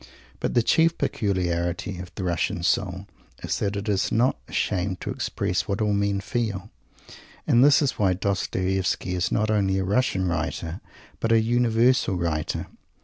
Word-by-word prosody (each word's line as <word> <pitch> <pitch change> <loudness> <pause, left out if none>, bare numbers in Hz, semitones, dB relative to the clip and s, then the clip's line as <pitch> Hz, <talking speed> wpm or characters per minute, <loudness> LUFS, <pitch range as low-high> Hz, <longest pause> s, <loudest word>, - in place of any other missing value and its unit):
But - - -2
the 120 - +4
chief 165 +6 +3
peculiarity 90 -2 -1
of 90 0 -7
the 95 - -4
Russian 85 -1 -1
soul 95 +1 0 0.4
is - - -2
that 100 0 -1
it 100 +2 -4
is 100 -2 +1
not 120 +4 +3
ashamed 95 0 -1
to - - -3
express - - -2
what 100 - -1
all 105 -1 +1
men 100 -1 0
feel. 110 -4 -3 0.7
And 120 - +5
this 145 +1 +6
is 135 - -1
why 95 -3 +3
Dostoievsky 95 -1 -1
is 90 0 -1
not 110 0 +1
only 95 -3 +2
a 95 - 0
Russian 100 -2 +1
writer 85 +1 -3 0.4
but 115 - 0
a 115 - +6
universal 120 -1 +2
writer. 85 -3 -2
100 Hz, 160 wpm, -25 LUFS, 90-110 Hz, 0.7 s, this